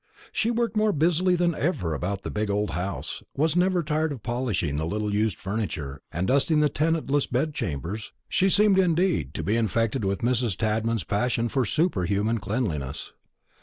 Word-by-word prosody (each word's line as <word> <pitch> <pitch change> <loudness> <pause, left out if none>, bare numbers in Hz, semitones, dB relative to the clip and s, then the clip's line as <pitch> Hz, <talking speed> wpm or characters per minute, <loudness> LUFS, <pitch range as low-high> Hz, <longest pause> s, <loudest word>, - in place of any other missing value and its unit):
She 225 - 0
worked 235 -1 0
more 215 -1 +3
busily 175 +4 +3
than 175 -1 +2
ever 120 - -1
about 95 +6 -3
the - - -4
big 105 0 -1
old 105 +1 0
house, 95 +2 -4 0.2
was 155 +3 +2
never 180 -1 +2
tired 155 0 0
of 130 -7 -7
polishing 115 - -1
the 80 - -1
little 105 +2 -2
used 105 -2 +1
furniture 80 -10 -4
and 85 +4 -1
dusting 140 +4 +3
the 150 -1 +4
tenantless 150 -2 +1
bed 145 +5 0
chambers; 90 - -4 0.2
she 190 - +2
seemed, 200 0 +4
indeed, 175 - +1
to - - -3
be 105 - +1
infected 115 +2 0
with 100 0 -1
Mrs. 120 -5 +1
Tadman's 110 0 0
passion 115 +2 0
for 130 0 +1
superhuman 105 - +1
cleanliness. 95 - -3
115 Hz, 170 wpm, -26 LUFS, 100-160 Hz, 0.2 s, the